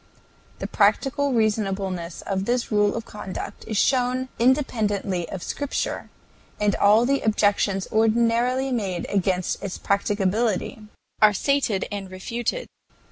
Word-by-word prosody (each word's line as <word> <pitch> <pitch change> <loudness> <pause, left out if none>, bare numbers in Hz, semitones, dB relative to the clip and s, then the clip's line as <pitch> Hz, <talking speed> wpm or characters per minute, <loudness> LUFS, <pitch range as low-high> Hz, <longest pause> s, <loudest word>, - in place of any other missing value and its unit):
The - - -5
practical 270 +7 +2
reasonableness 195 -6 -1
of 195 -1 -2
this 240 +1 -1
rule 205 -1 +3
of 230 - -4
conduct 200 -2 -7
is 215 -2 -2
shown 255 +2 +1
independently 215 - +1
of 185 - -6
Scripture, 285 -1 -3 0.5
and 210 -1 +2
all 210 +3 +5
the 275 +2 +1
objections 205 -2 +1
ordinarily 235 +4 +2
made 195 -8 -2
against 185 -2 0
its 195 - -4
practicability 200 +2 0 0.4
are 215 -1 +7
stated 250 -5 +1
and 200 -2 -5
refuted. 235 - -3
215 Hz, 120 wpm, -24 LUFS, 195-240 Hz, 0.5 s, are